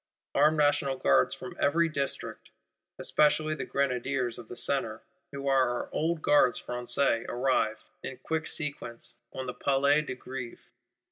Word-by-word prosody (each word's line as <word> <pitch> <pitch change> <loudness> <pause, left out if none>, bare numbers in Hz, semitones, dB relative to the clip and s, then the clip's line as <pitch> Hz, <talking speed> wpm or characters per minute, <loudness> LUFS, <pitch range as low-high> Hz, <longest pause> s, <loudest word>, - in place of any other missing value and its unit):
Armed 150 +3 +4
National 145 -2 +2
Guards 70 - +3
from - - -9
every 165 +4 +3
District; 140 -3 -4 0.5
especially 155 +1 +2
the 155 - -4
Grenadiers 130 -2 -1
of 115 - -10
the 120 - -8
Centre, 120 -5 -1 0.3
who 140 0 -5
are 135 -2 +4
our 120 - -4
old 160 0 -1
Gardes 145 -4 +4
Françaises, 120 0 0
arrive, 120 -3 0 0.2
in 130 - -6
quick 160 +4 -2
sequence, 120 -6 -2
on 130 - -5
the 125 - -4
Place 140 +3 +2
de - - -3
Grève. 125 -1 -8
135 Hz, 145 wpm, -29 LUFS, 125-145 Hz, 0.5 s, Armed